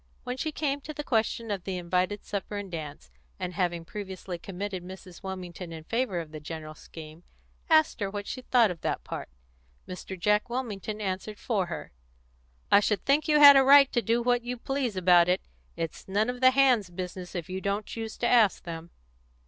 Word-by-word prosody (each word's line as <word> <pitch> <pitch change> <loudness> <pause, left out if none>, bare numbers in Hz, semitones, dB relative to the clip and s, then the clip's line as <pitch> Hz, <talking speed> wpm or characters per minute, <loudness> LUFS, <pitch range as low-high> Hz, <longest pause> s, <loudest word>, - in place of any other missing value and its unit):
When 250 0 -4
she 310 +4 -3
came 285 -2 -2
to 305 +2 -8
the 295 - -4
question 225 -2 0
of 195 -3 -3
the 190 -1 -3
invited 180 +3 -1
supper 205 0 -4
and 200 -2 -6
dance, 150 - -7 0.3
and 180 - -4
having 175 -3 -1
previously 190 -2 -6
committed 190 0 -5
Mrs. 185 -1 -11
Wilmington 185 -2 -7
in 160 -1 -8
favour 230 -1 -1
of 160 -2 -7
the 155 - -7
general 155 0 -7
scheme, 155 +1 -12 0.5
asked 315 -1 +4
her 200 -2 -1
what 205 0 -5
she 255 - -5
thought 240 -5 +3
of 165 - -8
that - - -2
part, - - -6 0.6
Mr. 185 0 -7
Jack 210 +5 +2
Wilmington 215 -4 -4
answered 200 +1 -4
for 200 -7 -1
her 170 - -6 0.8
"I - - +8
should 210 0 0
think 285 +4 +3
you 300 -1 +4
had 285 -1 +10
a 270 - +7
right 275 0 +7
to 240 - +1
do 235 +1 +1
what 245 0 +2
you 245 +1 -5
please 260 -3 -2
about 175 -1 +5
it. 180 +1 +1 0.3
It's 165 -1 -5
none 210 +5 +1
of 250 0 -10
the 255 - +8
hands' 255 -7 +3
business 180 +1 -7
if 170 -3 -4
you 185 +1 -5
don't 200 +2 -1
choose 225 -1 -6
to 240 - 0
ask 225 -5 +4
them." 165 0 -7
200 Hz, 200 wpm, -28 LUFS, 180-240 Hz, 0.8 s, had